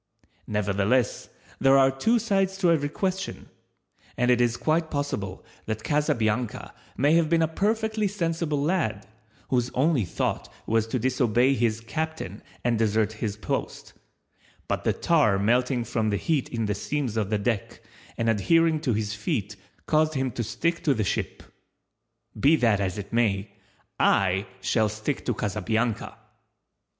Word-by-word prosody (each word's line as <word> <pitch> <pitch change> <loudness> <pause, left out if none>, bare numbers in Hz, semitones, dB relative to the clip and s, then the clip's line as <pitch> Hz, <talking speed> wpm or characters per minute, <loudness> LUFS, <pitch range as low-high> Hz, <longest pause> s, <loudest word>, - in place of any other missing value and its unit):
Nevertheless 105 +3 0 0.3
there 135 0 +5
are 135 0 +5
two 220 - +2
sides 195 -3 0
to 180 -3 +3
every 145 -3 +1
question, 190 +3 -3 0.7
and 125 +1 +3
it 125 0 +3
is 120 -1 +2
quite 160 +1 0
possible 125 -11 -3 0.2
that 110 0 -3
Casabianca 125 -6 0 0.2
may 145 +4 +3
have 165 -2 +3
been 165 -1 +3
a - - +2
perfectly 215 +4 0
sensible 165 -6 -1
lad, 140 - 0 0.4
whose 125 -1 +1
only 140 -2 +2
thought 85 - -3
was 110 0 +1
to 120 - -1
disobey 125 +1 +2
his 115 -3 0
captain 135 - -4 0.2
and 120 -2 +1
desert 110 -1 +1
his 105 -2 -2
post, 105 - -4 0.7
but - - -2
the - - +3
tar 145 -12 +3
melting 120 +4 +1
from 110 -2 -1
the 100 - 0
heat 145 - 0
in 115 -2 -2
the 105 - 0
seams 130 +2 -3
of 105 -3 -1
the 105 - +1
deck, 105 0 -3 0.3
and 115 - -1
adhering 160 - +3
to 130 -5 0
his 105 0 -2
feet 105 - -3 0.3
caused 155 0 +2
him 130 -1 0
to 120 - -3
stick 165 +10 -1
to 140 -4 +3
the 110 - 0
ship. - - -3 1.0
Be 150 +4 +5
that 115 -8 +2
as 95 -1 -2
it 100 +1 -7
may, 105 -3 +1 0.5
I 95 +1 +2
shall 110 -2 +2
stick 110 +6 -3
to 120 - 0
Casabianca! 110 +3 -1
120 Hz, 155 wpm, -26 LUFS, 110-155 Hz, 1.0 s, there